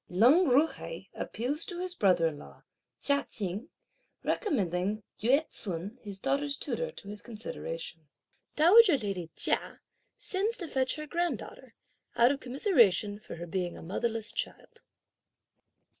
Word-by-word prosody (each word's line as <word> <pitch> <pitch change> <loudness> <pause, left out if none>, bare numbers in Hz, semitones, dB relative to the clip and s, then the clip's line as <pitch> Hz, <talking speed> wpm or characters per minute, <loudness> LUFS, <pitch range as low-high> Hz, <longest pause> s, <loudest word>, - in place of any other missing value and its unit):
Lin 250 - +5
Ju 280 +2 +5
hai 485 +8 -8
appeals 280 +8 -2
to 350 - -3
his 365 0 -2
brother 185 - +3
in 155 -3 -1
law, - - -14 0.4
Chia 280 0 +3
Cheng, 205 - -3 0.5
recommending 205 - 0 0.2
Yü 275 +8 +3
ts'un, 195 +4 -4
his 200 -3 -6
daughter's 280 +3 0
tutor, - - -2
to 340 - -11
his 205 0 -5
consideration. 165 -8 -6 0.5
Dowager 355 +2 +7
lady 195 -7 -4
Chia - - +1 0.4
sends 415 +4 -1
to 345 - -5
fetch 260 -3 +1
her 305 - -6
granddaughter, 345 +3 -4 0.4
out 240 +2 +5
of 280 - -2
commiseration 240 - +3
for - - -9
her 170 +1 -6
being 175 0 -3
a - - -10
motherless 225 +5 -2
child. 470 -1 -5
240 Hz, 140 wpm, -30 LUFS, 195-305 Hz, 0.5 s, Dowager